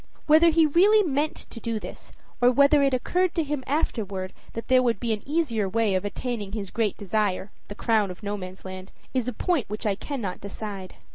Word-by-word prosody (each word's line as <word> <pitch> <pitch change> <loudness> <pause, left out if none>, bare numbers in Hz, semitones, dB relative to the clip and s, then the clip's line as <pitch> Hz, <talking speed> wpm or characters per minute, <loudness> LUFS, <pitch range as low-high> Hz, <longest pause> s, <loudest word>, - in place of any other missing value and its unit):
Whether 315 +2 +6
he 325 0 +5
really 395 +8 +5
meant 290 +1 0 0.2
to 230 - -7
do 230 0 -2
this, - - -9 0.3
or 245 - +7
whether 280 +3 +5
it 275 -1 +3
occurred 355 +8 +1
to 330 - +2
him 295 -2 -3
afterward 200 - -2 0.2
that 230 - -6
there 255 0 +5
would 235 -5 +1
be 230 -2 0
an 210 - -4
easier 265 - 0
way 220 0 +1
of 185 0 0
attaining 205 -1 -4
his 200 -4 -4
great 220 -4 0
desire, 205 -1 -1 0.2
the 205 - -8
crown 215 -3 +2
of 180 +3 -9
Nomansland, 185 -1 -6 0.2
is 255 -2 0
a - - 0
point 290 - -1
which 215 +2 -5
I 205 - +2
cannot 205 -3 -5
decide. 200 -1 -7
230 Hz, 200 wpm, -26 LUFS, 200-280 Hz, 0.3 s, or